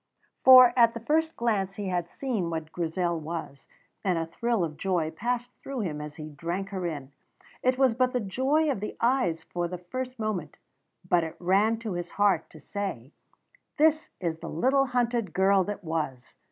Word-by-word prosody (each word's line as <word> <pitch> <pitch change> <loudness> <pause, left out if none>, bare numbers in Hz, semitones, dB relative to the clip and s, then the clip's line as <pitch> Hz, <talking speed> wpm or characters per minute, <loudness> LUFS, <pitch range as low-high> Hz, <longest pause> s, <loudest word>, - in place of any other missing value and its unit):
For 255 -1 +9
at 235 -2 +5
the - - -3
first 320 +7 +1
glance 200 -5 0
he 200 -2 -4
had 175 -2 -1
seen 225 -11 -2
what 160 -1 -4
Grizel 170 0 -1
was, 160 -3 -6 0.4
and 185 -3 +1
a 165 - -1
thrill 230 +4 -1
of 155 -2 -3
joy 170 -2 -1
passed 245 +7 -2
through 270 -3 -4
him 155 -7 -3
as 150 0 -7
he 155 -1 -7
drank 170 +6 -4
her 190 -3 -3
in; 145 -4 -6 0.5
it 255 0 +2
was 265 -3 +4
but 255 +2 +2
the 250 - 0
joy 265 +9 +1
of 255 - -2
the 210 - -5
eyes 230 -10 +1
for 175 +1 -3
the 180 +1 -5
first 255 +9 -6
moment, 210 -9 -3 0.5
but 175 -1 +3
it 160 - -5
ran 200 +5 +2
to 220 -4 -3
his 175 0 -4
heart 200 -5 +2
to 155 - -14
say, 150 - -5 0.7
"This 315 +1 +3
is 165 -3 -2
the 165 - -7
little 270 - +2
hunted 240 -5 0
girl 190 0 +4
that 205 -1 -5
was!" 155 -6 -3
195 Hz, 190 wpm, -27 LUFS, 165-240 Hz, 0.7 s, For